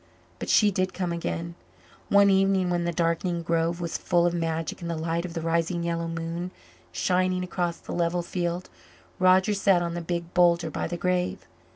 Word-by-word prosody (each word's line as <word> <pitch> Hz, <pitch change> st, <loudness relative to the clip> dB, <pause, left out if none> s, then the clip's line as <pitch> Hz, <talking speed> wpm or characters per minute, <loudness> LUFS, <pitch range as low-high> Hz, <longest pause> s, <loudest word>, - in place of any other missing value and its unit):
But -, -, -5 dB
she 210 Hz, -2 st, +5 dB
did 185 Hz, 0 st, -1 dB
come 180 Hz, -2 st, -2 dB
again. 170 Hz, 0 st, -3 dB, 0.6 s
One 200 Hz, 0 st, +6 dB
evening, 190 Hz, -1 st, +3 dB
when 175 Hz, -1 st, 0 dB
the 170 Hz, -, 0 dB
darkening 170 Hz, +1 st, 0 dB
grove 165 Hz, +1 st, 0 dB
was 170 Hz, -2 st, -3 dB
full 175 Hz, -1 st, +2 dB
of 175 Hz, -, +2 dB
magic 165 Hz, -1 st, -2 dB
in 170 Hz, -, -5 dB
the 170 Hz, -, -2 dB
light 165 Hz, +2 st, -1 dB
of 175 Hz, -1 st, -7 dB
the 165 Hz, -, -2 dB
rising 170 Hz, +1 st, 0 dB
yellow 170 Hz, 0 st, -1 dB
moon 165 Hz, +2 st, -4 dB, 0.4 s
shining 185 Hz, 0 st, +1 dB
across 175 Hz, -1 st, -2 dB
the -, -, -8 dB
level 175 Hz, 0 st, 0 dB
field, 175 Hz, 0 st, -3 dB, 0.5 s
Roger 185 Hz, +3 st, +4 dB
sat 195 Hz, -3 st, +3 dB
on 170 Hz, 0 st, -3 dB
the 175 Hz, -, -3 dB
big 170 Hz, 0 st, -4 dB
boulder 170 Hz, -2 st, +3 dB
by -, -, -2 dB
the 175 Hz, -, -4 dB
grave. 180 Hz, 0 st, -1 dB
175 Hz, 190 wpm, -26 LUFS, 170-180 Hz, 0.6 s, One